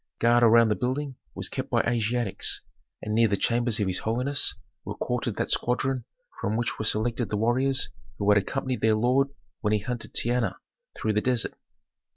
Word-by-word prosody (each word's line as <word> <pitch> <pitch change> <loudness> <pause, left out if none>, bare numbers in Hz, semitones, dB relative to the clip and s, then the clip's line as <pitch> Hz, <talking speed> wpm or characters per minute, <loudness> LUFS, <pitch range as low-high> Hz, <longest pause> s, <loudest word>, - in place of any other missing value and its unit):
Guard 120 +1 +4
around 115 -1 +6
the 105 - +2
building 130 +4 -2 0.2
was - - -2
kept - - -4
by - - +3
Asiatics, 115 -2 0 0.4
and 105 - -2
near 115 +1 +5
the 100 -1 +1
chambers 120 0 +1
of 105 - +2
his 95 -1 -1
holiness 125 +6 0 0.3
was - - -6
quartered - - -1
that - - -1
squadron 125 +1 0 0.4
from 110 - 0
which 120 0 -2
were 110 - -2
selected 115 +2 +1
the 105 - -1
warriors 130 +5 +2 0.3
who 100 - -2
had 100 - +6
accompanied 130 +2 -3
their 110 -1 +4
lord 125 +5 +3 0.3
when 105 -1 0
he 105 - +3
hunted 120 +2 -5
Tehenna 120 0 +1 0.4
through 110 - 0
the 105 - +2
desert. 125 -2 0
115 Hz, 185 wpm, -27 LUFS, 110-125 Hz, 0.4 s, around